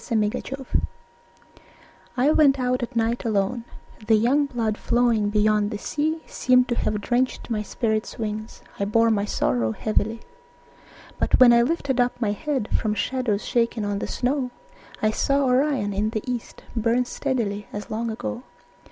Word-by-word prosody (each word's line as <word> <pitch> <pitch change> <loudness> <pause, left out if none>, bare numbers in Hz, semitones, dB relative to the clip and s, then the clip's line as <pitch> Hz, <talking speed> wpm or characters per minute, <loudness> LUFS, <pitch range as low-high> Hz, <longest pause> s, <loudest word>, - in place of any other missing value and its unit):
Winter 215 -3 +1
Stars 270 0 -7 1.5
I 265 +4 +4
went 280 -3 +4
out 250 0 0
at 240 +1 -5
night 230 +1 0
alone; 220 +2 0 0.4
The 220 - +5
young 265 +7 +3
blood 230 -5 -1
flowing 235 -3 +1
beyond 210 0 +2
the 210 - -4
sea 310 +7 -2
Seemed 250 0 +3
to 240 - +1
have 210 -2 -1
drenched 250 +2 -1
my 215 -2 0
spirit's 220 +1 -2
wings 215 0 -5 0.2
I 200 - +1
bore 230 +2 +3
my 205 -2 +1
sorrow 115 - 0
heavily. 220 - -1 1.0
But - - +2
when 245 -2 +8
I 235 - +6
lifted 270 -1 0
up 245 0 0
my 220 -4 +1
head 260 0 -2
From 215 -1 0
shadows 240 -4 -1
shaken 230 -2 0
on 205 -1 -1
the - - -3
snow, 255 0 -1 0.5
I 215 - +4
saw 275 +5 +1
Orion 255 -5 +1
in 205 +2 0
the 215 -1 -3
east 245 -2 -5
Burn 235 +2 +2
steadily 230 -7 -2
as 205 0 -7
long 230 +2 -2
ago. 105 - -4
230 Hz, 160 wpm, -24 LUFS, 210-255 Hz, 1.5 s, when